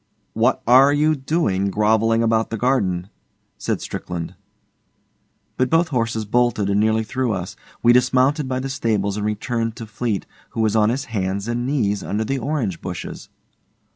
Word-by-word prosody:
'What - - +1
are 130 +4 +7
you 150 +2 +3
doing, 130 - 0
grovelling 110 +3 +2
about 115 0 +1
the 115 - -3
garden?' 100 -7 0 0.5
said - - -2
Strickland. 85 -2 -5 1.2
But 130 0 +1
both 165 +1 +3
horses 115 -5 -1
bolted 110 -3 +1
and 100 - +2
nearly 110 +1 +2
threw 125 +1 -1
us. 90 -2 -5 0.3
We 120 - +6
dismounted 130 +4 +3
by 130 0 -2
the 135 - -3
stables 105 -6 -1
and 105 - -2
returned 115 +2 -2
to 115 - -7
Fleete, 105 -1 -3 0.3
who - - +2
was 110 -1 +1
on 110 -1 +4
his 135 +4 -2
hands 100 0 -2
and 120 +1 -2
knees 105 -8 0
under 105 +2 -2
the 135 +4 -1
orange 125 - -2
bushes. 90 -2 -7
115 Hz, 165 wpm, -21 LUFS, 105-130 Hz, 1.2 s, are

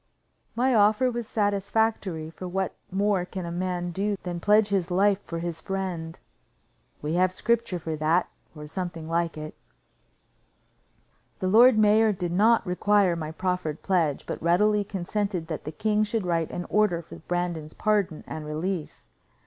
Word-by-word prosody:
My 255 +2 +2
offer 220 +4 +4
was 235 -2 -4
satisfactory, 205 -5 0
for 185 +2 -7
what 190 +1 -2 0.2
more 195 -1 +1
can 180 0 -6
a 170 - -5
man 175 0 -2
do 200 +3 -1
than 175 -1 -4
pledge 210 +3 +4
his 190 -3 0
life 195 +2 +3
for 170 - -6
his 165 -1 -4
friend? 185 -4 -4 0.9
We 150 +2 -1
have 180 +1 +3
scripture 230 0 0
for 160 -1 -4
that, 155 +3 +2 0.3
or 150 0 -8
something 170 0 -5
like 165 0 -1
it. 155 0 -6 1.8
The 185 - -2
lord 235 +3 +7
mayor 215 0 +5
did 180 -3 -3
not 220 +6 +4
require 195 0 +2
my 155 -2 -4
proffered 180 -3 -2
pledge, 170 -7 +1
but - - -5
readily 205 +5 +3
consented 195 -2 -3
that 155 - -5
the 155 - -4
king 210 +6 +1
should 215 -1 -2
write 165 -2 0
an 175 - -5
order 205 -5 +2
for - - -11
Brandon's 170 -3 -3
pardon 200 -7 0
and 155 - -6
release. 155 +3 -4
185 Hz, 155 wpm, -26 LUFS, 170-210 Hz, 1.8 s, lord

